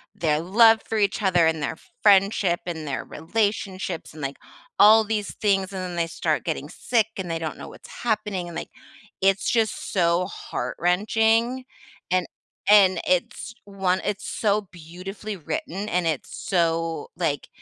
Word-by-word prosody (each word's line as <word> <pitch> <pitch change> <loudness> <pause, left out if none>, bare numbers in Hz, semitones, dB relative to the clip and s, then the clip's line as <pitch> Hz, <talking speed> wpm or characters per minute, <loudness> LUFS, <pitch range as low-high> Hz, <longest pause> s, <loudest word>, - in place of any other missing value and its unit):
their 155 -2 +1
love 220 +6 +5
for 225 - -1
each 205 0 +1
other 180 -4 +3
and 160 -1 +1
their 145 +3 -2 0.3
friendship 195 -3 +4
and 160 -4 -5
their 140 - -3
relationships 190 -3 -2
and, 155 - -10
like, 135 0 -4 0.4
all 220 +2 +8
these 210 -1 -3
things, 195 -2 0
and 190 - -4
then 180 -1 -5
they 170 -1 +1
start 165 - -1
getting - - -3
sick, 225 -3 0
and 185 -2 -4
they 165 0 -2
don't 160 -1 -4
know - - -9
what's - - -13
happening, 210 -5 -1
and 170 - -9
like, - - -5 0.5
it's 195 0 +2
just 225 -5 0
so 175 -1 +2
heart-wrenching, 225 +8 0 0.5
and 185 -1 +2 0.4
and 190 -4 +6
it's 185 +6 -1
one 190 -2 0
it's 205 0 -3
so 210 -1 +1
beautifully 185 +5 -8
written, 190 +5 -4
and 180 -3 0
it's 155 -4 -2 0.2
so 165 -3 0
like 155 -6 -1
190 Hz, 155 wpm, -24 LUFS, 170-210 Hz, 0.5 s, all